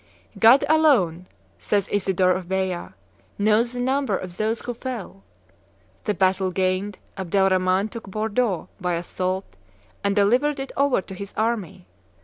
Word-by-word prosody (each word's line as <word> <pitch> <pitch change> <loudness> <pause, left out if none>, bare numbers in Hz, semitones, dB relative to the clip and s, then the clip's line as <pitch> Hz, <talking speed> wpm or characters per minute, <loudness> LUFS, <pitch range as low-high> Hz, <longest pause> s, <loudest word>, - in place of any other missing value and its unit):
"God 235 +5 +7
alone," 230 - +3 0.3
says 200 -2 0
Isidore 190 -2 +2
of 185 0 -1
Beja, 190 -2 -2 0.4
"knows 220 +4 +2
the 245 - -5
number 260 -4 +1
of 180 -1 -8
those 220 +2 0
who 245 - -4
fell." 235 - -6 0.8
The 210 - 0
battle 190 0 +2
gained, 185 +2 -1 0.2
Abdel 190 +1 +2
Rhaman 185 +2 +2
took 230 -3 -9
Bordeaux 215 -1 -1
by 180 -2 -1
assault 185 +2 -2 0.6
and 200 0 +1
delivered 250 +8 +2
it 270 - -4
over 280 -6 +2
to - - -10
his 200 +1 -8
army. 220 - -2
200 Hz, 140 wpm, -23 LUFS, 185-235 Hz, 0.8 s, God